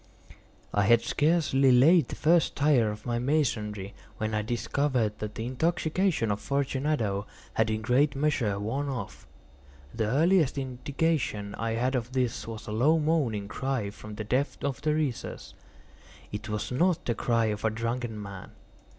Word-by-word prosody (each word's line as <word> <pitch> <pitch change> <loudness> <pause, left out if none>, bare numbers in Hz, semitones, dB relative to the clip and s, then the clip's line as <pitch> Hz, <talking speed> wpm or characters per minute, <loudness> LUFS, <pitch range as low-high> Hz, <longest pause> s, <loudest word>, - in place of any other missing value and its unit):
I 105 - +3
had 115 +2 +5
scarcely 145 -1 +3
laid 155 +7 +6
the - - -6
first 165 +1 +3
tier 140 -6 +3
of 105 0 -7
my 120 -1 -1
masonry 105 -8 -1 0.2
when 110 0 -2
I 105 - +1
discovered 120 0 -1
that 105 0 -5
the 110 - -4
intoxication 160 - 0
of 100 - -1
Fortunato 135 -7 -1 0.3
had 110 0 +2
in 110 0 -1
a - - -10
great 130 +5 +2
measure 135 -8 +1
worn 135 +8 -2
off. 125 -8 -6 0.7
The 110 -2 -1
earliest 155 - +3
indication 130 -5 -1
I 115 0 -2
had 125 +3 0
of 125 -1 -2
this 125 -3 -1
was 115 -1 -7
a - - -6
low 135 +9 +3
moaning 145 -10 0
cry 120 0 -2
from 105 +1 -10
the 110 - -4
depth 130 +7 -1
of 140 -2 -2
the 150 0 +1
recess. 145 -6 -3 0.8
It 105 +2 -6
was 105 +3 -3
not 175 +7 +1
the 120 - +1
cry 115 0 +1
of 105 - -7
a 110 - +3
drunken 115 0 -3
man. 100 -2 -9
125 Hz, 165 wpm, -28 LUFS, 110-145 Hz, 0.8 s, laid